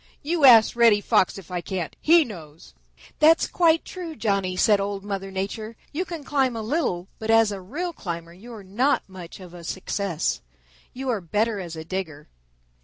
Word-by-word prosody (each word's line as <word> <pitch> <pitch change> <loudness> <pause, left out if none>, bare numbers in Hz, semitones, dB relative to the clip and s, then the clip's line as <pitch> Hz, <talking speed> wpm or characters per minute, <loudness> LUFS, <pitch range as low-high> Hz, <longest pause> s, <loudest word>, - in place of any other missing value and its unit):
You 315 0 +2
ask 230 -4 +7
Reddy 230 -3 +5
Fox 190 -2 +2
if 185 -3 -12
I 180 -1 -2
can't; 180 -3 -4
he 330 0 +5
knows." 160 - -11 0.5
"That's 320 +2 +5
quite 330 -2 +2
true, 345 -4 -7
Johnny," 195 -6 -1
said 210 0 +4
Old 200 0 -3
Mother 195 -1 -4
Nature. 205 +4 -5 0.2
"You 350 +5 -2
can 335 -5 -7
climb 265 -4 0
a 225 - -4
little, 215 - -1
but 220 - -6
as 225 -1 +5
a 195 -2 -6
real 325 - -4
climber 170 - -6
you 215 +7 -13
are 210 - -10
not 245 +8 +1
much 185 -2 -11
of 180 -2 -12
a 175 -1 -11
success. 190 -1 -2 0.5
You 265 +1 -5
are 225 -5 0
better 210 +5 -1
as 170 -3 -6
a 160 0 -7
digger." 160 -5 -5
205 Hz, 185 wpm, -24 LUFS, 185-260 Hz, 0.5 s, ask